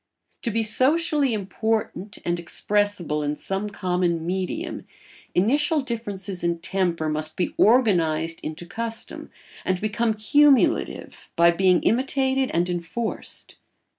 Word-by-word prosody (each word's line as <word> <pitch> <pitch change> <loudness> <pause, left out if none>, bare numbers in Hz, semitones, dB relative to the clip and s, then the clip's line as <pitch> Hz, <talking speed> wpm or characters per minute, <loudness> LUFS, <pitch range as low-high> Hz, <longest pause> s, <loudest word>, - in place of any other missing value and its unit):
To 235 - -1
be 225 +1 0
socially 285 +4 +2
important 215 0 -2
and 175 0 0
expressible 185 -3 0
in 145 0 -1
some 195 +6 -3
common 180 -4 -1
medium, 185 +1 -3 0.5
initial 290 - +2
differences 205 -7 -4
in 170 0 +1
temper 175 -2 -1
must 155 0 -2
be 180 - -1
organised 165 -9 +3
into 160 +2 -6
custom 225 +5 -4 0.3
and 185 -1 0
become 215 +2 0
cumulative 280 +5 +2
by 170 0 +6
being 180 0 +3
imitated 265 +2 +1
and 170 +1 +1
enforced. 180 +6 -5
195 Hz, 115 wpm, -24 LUFS, 175-230 Hz, 0.5 s, by